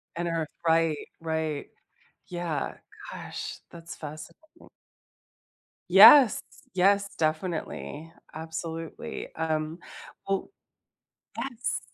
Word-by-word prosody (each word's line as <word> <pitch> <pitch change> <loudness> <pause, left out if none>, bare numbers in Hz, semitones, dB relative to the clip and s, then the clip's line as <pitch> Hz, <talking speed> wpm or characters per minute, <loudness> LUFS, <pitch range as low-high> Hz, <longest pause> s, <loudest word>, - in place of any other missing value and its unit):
And 170 0 -2
Earth, 165 -2 -1 0.2
right, 165 -1 +3 0.2
right. 160 -2 -2 0.6
Yeah. 175 -5 -3 0.4
Gosh, - - -6
that's 170 0 -10
fascinating. 155 - -11 1.2
Yes. 270 -7 +9 0.3
Yes, 200 +2 +3
definitely. 160 -1 -2 0.2
Absolutely. 160 +1 -6
Um, 160 +1 -2 0.5
well 195 -1 -1 0.9
Yes. 250 -2 -3
165 Hz, 75 wpm, -28 LUFS, 155-180 Hz, 1.2 s, Yes